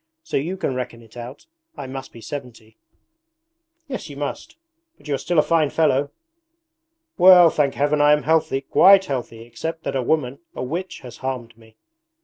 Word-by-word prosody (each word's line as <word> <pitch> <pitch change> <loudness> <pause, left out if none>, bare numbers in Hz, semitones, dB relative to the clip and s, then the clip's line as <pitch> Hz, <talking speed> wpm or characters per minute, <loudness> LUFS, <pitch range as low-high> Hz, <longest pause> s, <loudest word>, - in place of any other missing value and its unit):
So - - -6
you 170 +7 -1
can 160 - -2
reckon 125 -2 -6
it 110 0 -19
out. 120 - -9 0.3
I - - -6
must 135 0 -8
be 115 - -13
seventy.' 115 -5 -9 1.1
'Yes 260 - -6
you 140 - -10
must, 145 0 -5 0.4
but - - -17
you 145 - -1
are - - +1
still 175 - -2
a 150 - +6
fine 160 -3 +2
fellow.' 145 -3 +1 1.1
'Well, 180 -2 +8
thank 140 -3 0
Heaven 145 +3 +1
I 145 0 +5
am 150 - +1
healthy, 155 -3 +1
quite 195 +7 +5
healthy, 125 -5 -5
except 160 +7 -6
that - - -3
a 135 - +1
woman, 135 -1 -1 0.2
a - - -4
witch, 170 +8 -5
has 125 -2 -11
harmed 125 -3 -5
me....' 110 -1 -21
140 Hz, 180 wpm, -22 LUFS, 125-160 Hz, 1.1 s, Well